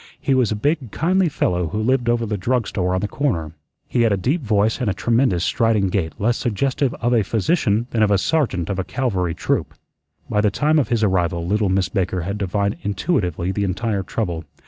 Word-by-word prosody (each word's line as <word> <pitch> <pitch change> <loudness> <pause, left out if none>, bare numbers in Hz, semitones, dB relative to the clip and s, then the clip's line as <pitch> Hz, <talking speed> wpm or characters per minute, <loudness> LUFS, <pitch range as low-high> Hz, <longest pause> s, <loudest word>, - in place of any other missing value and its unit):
He 135 - 0
was 130 -4 +2
a - - 0
big, 145 +3 -1
kindly 180 - +1
fellow 90 - 0
who 80 - -4
lived 120 +2 +1
over 120 -1 +1
the 105 -1 -2
drug 120 +4 0
store 90 -2 -1
on 95 - -1
the 105 - -1
corner. 100 - -1 0.4
He 120 - 0
had 115 -2 +3
a 100 - +2
deep 135 - 0
voice 110 0 +1
and 120 - +1
a 95 - -1
tremendous 115 -5 +1
striding 110 -4 +2
gait 90 -4 -1
less 115 +3 +1
suggestive 130 +3 0
of 120 +1 0
a 115 - +4
physician 115 - +1
than 115 - 0
of 105 - +4
a 100 - +4
sergeant 100 - 0
of 95 - -2
a - - 0
cavalry 95 -9 -1
troop. - - -1 0.5
By 105 - +1
the 105 - +3
time 150 +9 +2
of 140 - +1
his 115 -2 0
arrival 85 -4 +1
little 105 +2 +1
Miss 95 0 +1
Baker 95 -1 -1
had 100 +5 -4
divined 100 +1 -1
intuitively 95 - -1
the 100 +1 -1
entire 100 +2 -1
trouble. 90 -4 -3
105 Hz, 215 wpm, -21 LUFS, 95-120 Hz, 0.5 s, a